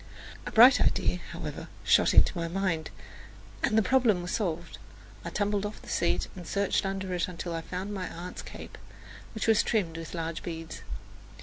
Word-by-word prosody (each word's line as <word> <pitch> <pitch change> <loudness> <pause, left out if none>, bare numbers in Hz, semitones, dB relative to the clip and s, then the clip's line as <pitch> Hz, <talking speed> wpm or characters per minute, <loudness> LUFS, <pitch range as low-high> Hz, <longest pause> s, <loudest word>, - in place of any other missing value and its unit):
A - - -4
bright 245 +4 +8
idea, - - +2
however, - - -6 0.2
shot - - +4
into - - +6
my 170 -1 -2
mind, 170 -3 -1 0.7
and 215 - +2
the 220 - +5
problem 230 -7 +3
was 175 - -4
solved. 175 -5 -2 0.4
I - - -4
tumbled 205 -1 0
off 210 +1 -5
the - - -13
seat 85 +1 +1
and 180 -3 -9
searched 200 0 +1
under 190 -1 -3
it 175 -1 0
until 175 -1 -5
I 165 - -2
found 185 +5 -5
my 185 -3 -3
aunt's 175 +2 -7
cape, - - -10 0.6
which 220 - -2
was 225 0 +5
trimmed 175 -8 0
with 165 +1 -7
large 165 -1 -3
beads. 165 -2 -6
185 Hz, 180 wpm, -29 LUFS, 165-205 Hz, 0.7 s, bright